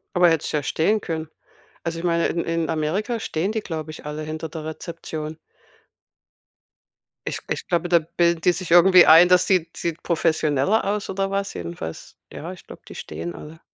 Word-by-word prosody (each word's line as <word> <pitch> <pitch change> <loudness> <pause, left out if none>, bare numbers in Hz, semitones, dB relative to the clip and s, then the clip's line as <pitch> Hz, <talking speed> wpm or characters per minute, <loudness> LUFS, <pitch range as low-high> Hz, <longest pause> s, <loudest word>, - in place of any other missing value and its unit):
Aber 180 -1 +6
hättest 165 -2 0
ja 150 -1 0
stehen 205 +10 +1
können. 160 -4 -4 0.6
Also 165 0 -3
ich 175 - -5
meine, 170 -1 +2
in 170 - -2
in 165 -1 -1
Amerika 180 +10 -1
stehen 180 0 -2
die, 220 - -1
glaube 160 -5 -5
ich, 155 - -11
alle 150 +1 -5
hinter 155 +1 -5
der 160 -1 -7
Rezeption. 160 -1 -6 1.9
Ich - - -2
ich - - -3
glaube, 175 0 0
da 170 -1 +5
bilden 170 +1 +1
die 180 - +4
sich 175 -1 -4
irgendwie 180 +1 +8
ein, 165 +3 +8
dass 180 0 +5
sieht 170 -3 +1
sieht 170 -1 -3
professioneller 160 +2 +1
aus 205 +1 -2
oder 195 0 -2
was 200 0 -2
jedenfalls. 85 -1 -7 0.2
Ja, 170 +4 -7
ich 185 - -13
glaub, - - -13
die - - -11
stehen 85 +2 -6
alle. 155 - -11
165 Hz, 185 wpm, -23 LUFS, 155-180 Hz, 1.9 s, irgendwie